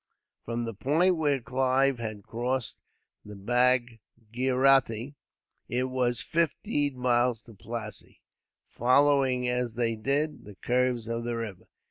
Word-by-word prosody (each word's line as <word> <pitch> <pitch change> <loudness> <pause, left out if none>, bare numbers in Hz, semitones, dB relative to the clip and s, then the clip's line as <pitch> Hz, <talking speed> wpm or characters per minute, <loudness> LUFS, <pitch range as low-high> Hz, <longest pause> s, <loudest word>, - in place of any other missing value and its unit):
From 120 0 -3
the 115 - -4
point 160 - +2
where 145 -4 +1
Clive 130 +1 +1
had 110 -3 -5
crossed 120 +2 -3 0.4
the 105 0 -10
Bhagirathi 125 +2 +1 0.6
it 125 +1 0
was 130 -2 0
fifteen 145 -4 0
miles 120 -2 +1
to 115 - -15
Plassey, 110 +1 -8 0.5
following, 130 0 +3
as 125 -2 -1
they 115 -1 0
did, 140 +6 -1
the 105 -1 -12
curves 125 0 0
of 115 0 -3
the 120 0 -2
river. 110 -5 -6
125 Hz, 120 wpm, -28 LUFS, 115-130 Hz, 0.6 s, following